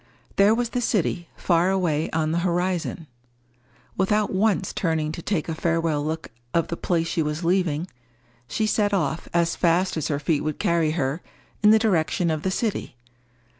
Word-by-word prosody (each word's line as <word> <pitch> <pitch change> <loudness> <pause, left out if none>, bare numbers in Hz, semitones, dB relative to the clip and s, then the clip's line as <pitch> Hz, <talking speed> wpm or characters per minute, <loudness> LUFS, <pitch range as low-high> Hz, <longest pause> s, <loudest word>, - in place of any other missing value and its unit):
There 205 +3 +5
was 240 0 -1
the 245 - -2
city 180 -6 0
far 175 0 +2
away 170 -5 0
on 160 -1 0
the 170 - +1
horizon. 175 -1 -1 0.9
Without 210 +2 +1
once 195 -1 +1
turning 160 -3 0
to 165 - -6
take 175 -4 -1
a 165 - -2
farewell 165 -2 0
look 160 +1 -4 0.3
of 170 - +1
the 170 - -2
place 170 -1 0
she 165 - -1
was 150 +2 -2
leaving, 170 -3 +1 0.6
she 220 - -1
set 205 -1 +1
off, 160 -3 -1
as 170 -1 +1
fast 175 +1 +2
as 155 - -1
her 145 - 0
feet 150 +1 0
would 155 -1 -2
carry 170 -2 +1
her, 145 +1 -1 0.4
in 210 - +6
the 220 - +7
direction 175 -5 +1
of 155 -1 -2
the 190 - -1
city. 205 - -2
170 Hz, 175 wpm, -24 LUFS, 160-190 Hz, 0.9 s, the